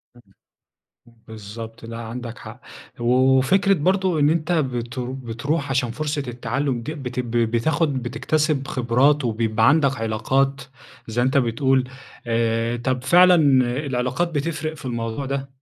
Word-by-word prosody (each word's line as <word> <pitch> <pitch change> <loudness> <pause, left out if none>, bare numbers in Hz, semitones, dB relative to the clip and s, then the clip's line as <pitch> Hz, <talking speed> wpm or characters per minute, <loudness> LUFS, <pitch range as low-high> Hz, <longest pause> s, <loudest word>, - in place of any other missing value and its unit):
إمم، 110 -5 -22 1.0
بالضبط. 110 +2 -9
لأ، 115 0 -7
عندك 115 +1 -7
حق. 115 +3 -11 0.4
وفكرة 130 +11 +3
برضه 185 +1 +1
إن 145 +1 +4
أنت 165 +1 0
بت 130 -5 -2
بتروح 130 +4 -3
عشان 130 -3 0
فرصة 150 +3 -3
التعلم 125 +1 -2
دي 155 +7 -5
بتب 125 -4 -5
بتاخد 125 +5 0
بتكتسب 150 +2 -1
خبرات 130 +4 +2
وبيبقى 115 0 +1
عندك 140 -3 +3
علاقات، 135 +5 0 0.5
زي 115 +2 -1
ما - - +2
أنت 130 +1 +2
بتقول. 130 +1 +1 0.4
آآ، 115 0 0
طب 125 +1 -2
فعلًا 180 +6 +6 0.5
العلاقات 130 +6 -1
بتفرق 155 +1 -2
في 150 - -13
الموضوع 115 +2 -3
ده؟ 135 0 -3
130 Hz, 130 wpm, -22 LUFS, 115-145 Hz, 1.0 s, فعلًا